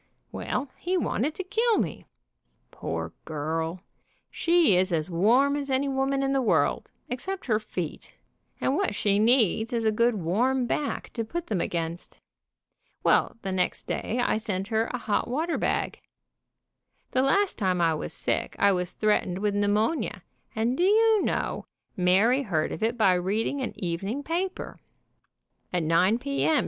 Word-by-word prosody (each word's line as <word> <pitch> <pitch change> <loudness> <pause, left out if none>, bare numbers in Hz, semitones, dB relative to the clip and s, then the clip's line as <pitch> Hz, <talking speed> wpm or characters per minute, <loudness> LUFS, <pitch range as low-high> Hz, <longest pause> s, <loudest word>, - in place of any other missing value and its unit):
Well, 275 - -3
he 365 +1 0
wanted 300 -3 -1
to 380 - -4
kill 450 +4 +1
me. - - -3 0.6
Poor - - -5
girl, 160 +3 -3 0.5
she 335 - +3
is 185 +1 +3
as 165 +1 0
warm 240 +11 +3
as 285 -1 -3
any 265 +1 +1
woman 270 0 0
in 270 - 0
the 270 -1 +2
world, 170 - +1 0.2
except 370 +11 -4
her 215 -4 +2
feet, 180 -7 -6 0.4
and 265 - +1
what 385 - 0
she 200 -1 +2
needs 225 -1 +3
is 230 -2 -1
a 220 - +4
good 235 +2 +2
warm 235 +9 +1
back 285 +4 -3
to 230 - -2
put 340 +10 -4
them 195 -6 -1
against. 170 0 -4 0.8
Well, - - +3
the 195 - -2
next 185 -1 -1
day 240 - -2
I - - +1
sent 200 -3 -3
her 220 0 +1
a 250 - -3
hot 220 -3 -1
water 315 +7 -1
bag. - - -1 1.1
The 255 - +2
last 380 +8 +2
time 185 -3 +1
I 165 -1 +3
was 155 - -4
sick - - -2
I 200 - +4
was 180 -2 -2
threatened 210 -4 +1
with 205 +1 0
pneumonia, 210 +8 0 0.3
and 230 +3 +1
do 345 - +1
you 435 +2 +4
know, - - -2 0.3
Mary 195 +9 +3
heard 165 - -1
of - - -6
it 230 +2 0
by 195 -5 +4
reading 205 +9 -1
an 255 - -3
evening 195 +10 -3
paper. 360 +5 -3 0.9
About 180 -2 0
9 180 +7 +3
p. 275 +3 -1
m. 310 -3 +4
225 Hz, 165 wpm, -26 LUFS, 185-275 Hz, 1.1 s, a